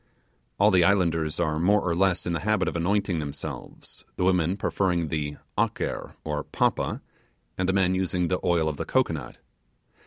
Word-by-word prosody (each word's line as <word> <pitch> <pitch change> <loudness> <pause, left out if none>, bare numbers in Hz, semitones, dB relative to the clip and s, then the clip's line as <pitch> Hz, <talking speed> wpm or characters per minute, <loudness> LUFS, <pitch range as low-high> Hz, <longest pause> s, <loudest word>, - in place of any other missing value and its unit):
All 105 +2 +5
the 90 -2 +5
islanders 85 -5 +2
are 80 -3 0
more 100 +5 +4
or 85 - +1
less 95 0 +2
in 85 - -1
the 85 - -1
habit 105 -3 +1
of - - -2
anointing 90 0 0
themselves; 70 -2 -7
the - - -1
women 90 0 +2
preferring 90 -6 0
the 75 -2 -3 0.2
'aker' - - -2
to 75 -1 -2
'papa', - - 0 0.5
and 95 0 -1
the - - +2
men 95 -1 +3
using 90 -1 0
the 90 - 0
oil 85 -3 +2
of 75 -2 -2
the - - -3
cocoanut. 80 - -1
90 Hz, 175 wpm, -26 LUFS, 80-95 Hz, 0.5 s, All